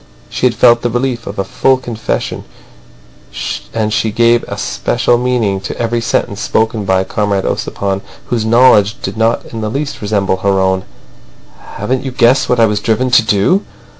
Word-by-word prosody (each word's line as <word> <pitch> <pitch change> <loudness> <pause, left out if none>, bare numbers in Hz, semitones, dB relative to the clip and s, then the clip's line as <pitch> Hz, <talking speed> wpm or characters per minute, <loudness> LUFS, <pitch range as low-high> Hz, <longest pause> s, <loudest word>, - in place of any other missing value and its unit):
She 125 - +1
had 120 - -2
felt 120 +1 +5
the 120 - 0
relief 120 0 -2
of 100 - -6
a 95 - 0
full 130 +6 +1
confession, 120 -3 -4 1.3
and 110 -1 -1
she 115 0 +1
gave 115 +2 +3
a - - -5
special 120 - 0
meaning 120 -6 0
to 95 - -6
every 115 0 -1
sentence 105 -2 -1
spoken 110 -1 0
by 95 -1 +2
Comrade 100 0 -1
Ossipon, 100 -1 -2 0.3
whose 115 -3 0
knowledge 110 -2 +4
did - - -4
not 115 +1 0
in 110 - -4
the 110 - -2
least 140 +5 -4
resemble 100 -3 0
her 95 0 +1
own. 95 0 0 0.9
"Haven't 130 0 -2
you 135 - -3
guessed 125 +1 +2
what 125 - +2
I 115 - +6
was 105 -1 0
driven 120 +4 0
to 120 - +6
do!" 110 - +2
115 Hz, 175 wpm, -14 LUFS, 100-120 Hz, 1.3 s, I